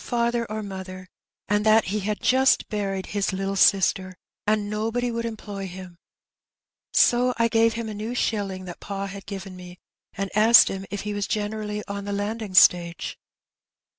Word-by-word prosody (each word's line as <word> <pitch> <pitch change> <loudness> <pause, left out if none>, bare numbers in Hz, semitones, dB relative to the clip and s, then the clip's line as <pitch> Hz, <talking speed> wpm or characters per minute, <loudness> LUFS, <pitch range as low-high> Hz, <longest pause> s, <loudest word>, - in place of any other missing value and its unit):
father 235 -1 0
or 215 0 -3
mother, 190 -1 -8 0.4
and 205 +1 +1
that 215 -2 +4
he 210 - 0
had 210 +1 -3
jast 265 +1 +3
buried 195 -2 -3
his 200 -1 -1
little 195 +1 -3
sister, 190 -1 +3 0.3
and 210 -1 +1
nobody 225 +4 -2
would 230 0 -3
employ 205 -3 -6
him; 185 -1 -10 1.0
so 245 +1 +3
I 230 0 +3
gave 225 0 +3
him 230 0 -4
a 215 - -5
new 215 +4 -5
shilling 195 -6 -2
that 175 -1 -9
pa 195 -1 -5
had 195 0 -9
given 195 -2 -7
me, 180 0 -11 0.4
and 195 0 -5
asked 220 +2 +7
him 195 0 -6
if 205 - -4
he 210 0 -4
was 205 -1 -2
generally 210 0 -3
on 200 0 -5
the 205 - -3
landing 205 0 -4
stage. 170 -2 +4
205 Hz, 170 wpm, -24 LUFS, 195-220 Hz, 1.0 s, asked